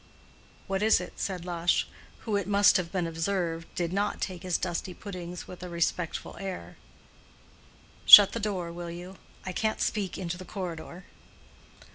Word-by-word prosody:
"What 195 0 -2
is 220 +1 +4
it?" 180 - -8
said 180 -3 -3
Lush, 175 -1 0 0.3
who, 220 -3 -2
it 200 -2 -1
must 200 0 +5
have 175 -2 -4
been 180 -3 -1
observed, 165 0 -2
did 175 0 -2
not 205 +1 -1
take 185 -2 -4
his 180 -2 0
dusty 180 0 -4
puddings 180 -3 -8
with 180 - -10
a 180 - -6
respectful 170 0 -2
air. 185 - -7 1.3
"Shut 205 -2 +12
the 230 - -4
door, 190 -5 -3
will 170 0 -7
you? 180 +2 -9 0.3
I 185 - -3
can't 220 +3 -1
speak 200 -4 -2
into 175 -1 -4
the - - -7
corridor." 175 -1 -7
180 Hz, 160 wpm, -28 LUFS, 170-195 Hz, 1.3 s, Shut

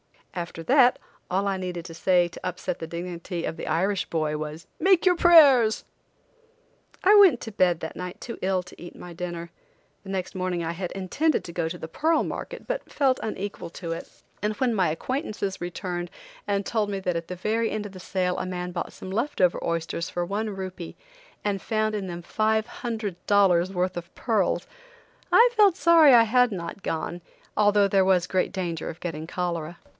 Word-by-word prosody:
After 170 -2 -5
that 255 - +5 0.3
all 195 +2 0
I 195 -1 0
needed 180 -2 -5
to 165 - -8
say 175 +1 +3
to 175 - -11
upset 180 -1 -4
the 165 - -5
dignity 170 0 -5
of - - -3
the - - -6
Irish 190 +4 +1
boy 155 -2 -1
was: 155 +2 -6
"Make 375 -2 +4
your 360 -1 +5
prayers!" 280 -11 +6 1.2
I 395 +2 +6
went 385 - +7
to 225 - -6
bed 180 -4 +2
that 160 - -6
night 180 0 -6
too 235 - -7
ill 185 -1 0
to 180 - -15
eat 175 - -9
my 175 - -10
dinner. 170 -1 -6 0.5
The 195 - -11
next 190 -2 -3
morning 185 -2 -2
I 165 - -2
had 175 +1 -5
intended 195 - 0
to 170 - -8
go 170 -1 -2
to 175 - -6
the 160 - -8
pearl 320 - +2
market, - - -6
but - - -4
felt 265 -2 +2
unequal 205 -4 -5
to 170 -2 -6
it, 165 - -5 0.3
and 210 0 -1
when 245 +1 +1
my 190 -6 +2
acquaintances 205 - -3
returned 175 0 -4 0.4
and 200 -1 0
told 215 -3 0
me 200 -1 -2
that 180 -2 -1
at 165 0 -5
the 180 - -5
very 220 +5 0
end 215 -1 -3
of 205 - -7
the 185 - -11
sale 180 -1 -1
a - - -2
man 180 -1 -4
bought 175 - -4
some 185 - -8
left 235 +9 -2
over 180 -2 +3
oysters 170 0 -2
for 175 0 -2
one 210 +4 -2
rupee 185 -3 -6 0.5
and 200 -2 -1
found 215 -1 0
in 200 -3 -3
them 175 -1 -6
five 220 +3 +1
hundred 220 -6 -4
dollars 190 -3 +4
worth 185 -1 -1
of 175 0 -8
pearls, 205 -7 0 0.7
I 475 +2 +7
felt 415 -6 +5
sorry 325 -1 +6
that 240 -2 +8
I - - +5
had 250 +2 +3
not 180 0 -6
gone, 170 +1 -3 0.3
although 205 -1 +4
there 195 -1 +3
was 185 -2 +3
great 185 0 0
danger 170 -4 -3
of 165 - -8
getting 160 -2 -5
cholera. 170 -2 -3
185 Hz, 200 wpm, -26 LUFS, 175-215 Hz, 1.2 s, that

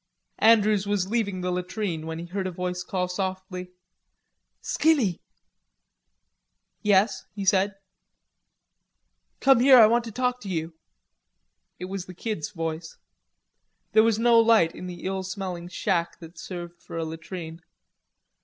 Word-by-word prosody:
Andrews 215 -2 +4
was 200 -1 -1
leaving 200 -5 -1
the 180 0 -1
latrine 180 -2 -3
when 160 0 -4
he 170 - -6
heard 185 +2 -3
a - - -4
voice 180 0 -3
call 180 0 -2
softly, 185 0 -4 0.9
"Skinny." 275 - +1 1.6
"Yes," 205 +1 +2
he 200 -2 -4
said. 195 +1 +3 1.7
"Come 270 -3 +5
here, 260 +1 +8
I 225 - +9
want 235 +2 +3
to 225 - -6
talk 250 +2 -1
to 200 - -7
you." 165 -2 -3 1.0
It 180 - -6
was 190 0 -5
the 180 - -10
Kid's 210 -5 -4
voice. 165 -3 -5 0.9
There 220 - +6
was 225 -1 +2
no 230 0 +5
light 225 -8 +4
in 180 - -8
the 175 -1 -8
ill 190 0 -2
smelling 185 -2 -5
shack 175 -2 -1
that 165 +1 -12
served 175 -2 -8
for - - -8
a 165 - -2
latrine. 165 +1 -7
185 Hz, 140 wpm, -26 LUFS, 175-215 Hz, 1.7 s, I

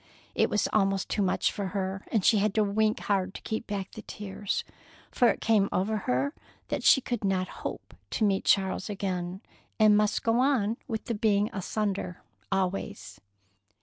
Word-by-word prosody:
it - - +2
was 210 - +1
almost 195 -2 +2
too 210 - 0
much 190 -2 +1
for 200 -2 -3
her, 190 0 -3
and 215 -5 +1
she 220 - +5
had 205 0 +1
to 215 - +4
wink 215 +1 +1
hard 195 -1 0
to - - -7
keep 220 +1 -3
back 200 -2 -4
the 220 - -9
tears, 205 -1 -4 0.5
for 245 - +4
it - - +2
came 210 -3 +3
over 210 +4 0
her 130 +4 +1 0.4
that - - -1
she - - +7
could 240 -4 -3
not 190 -2 +1
hope - - -6 0.2
to - - -1
meet 195 -2 +1
Charles 190 +1 +2
again, 185 -2 -3 0.4
but 215 -1 +6
must 210 0 +2
go 230 +1 +2
on 250 -5 +2
with 220 -2 -4
the 235 - -2
being 210 -1 +2
asunder 195 -2 -3 0.3
always. 190 - -2
200 Hz, 180 wpm, -28 LUFS, 190-215 Hz, 0.5 s, she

